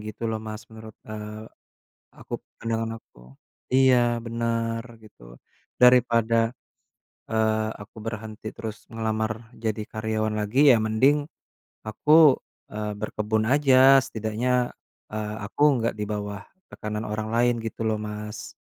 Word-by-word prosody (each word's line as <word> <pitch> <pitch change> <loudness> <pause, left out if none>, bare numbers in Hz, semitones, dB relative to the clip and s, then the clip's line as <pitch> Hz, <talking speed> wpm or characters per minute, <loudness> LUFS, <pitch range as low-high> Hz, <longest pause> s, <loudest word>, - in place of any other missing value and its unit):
gitu 110 +2 -7
loh 110 -1 -1
Mas 110 0 -7
menurut, 110 -1 -11
eee, 105 0 -7 0.7
aku - - -14 0.3
pandangan 115 0 -2
aku, 60 - -20 0.4
iya 125 -2 +4
bener 115 0 -1 0.2
gitu, - - -16 0.4
daripada, 115 -2 +4 0.8
eee, 110 -1 +1
aku 105 +2 -13
berhenti 110 -1 -6
terus 110 -2 -7
ngelamar 110 0 -3
jadi 110 -2 -3
karyawan 110 0 -1
lagi 130 +7 +5
ya 115 - +3
mending, 135 +7 +2 0.6
aku, 150 +7 +6 0.4
eee, 105 -1 -4
berkebun 110 +1 -1
aja 135 +1 +6
setidaknya, 120 +2 -1 0.4
eee, 105 0 -3
aku 105 +8 -8 0.2
nggak 115 0 0
di 105 -1 -4
bawah, 105 -1 -4 0.2
tekanan 105 +1 -5
orang 110 +1 -3
lain 120 0 +2
gitu 115 0 -4
loh, 110 -1 0
Mas. 105 0 -6
110 Hz, 125 wpm, -25 LUFS, 110-115 Hz, 0.8 s, aku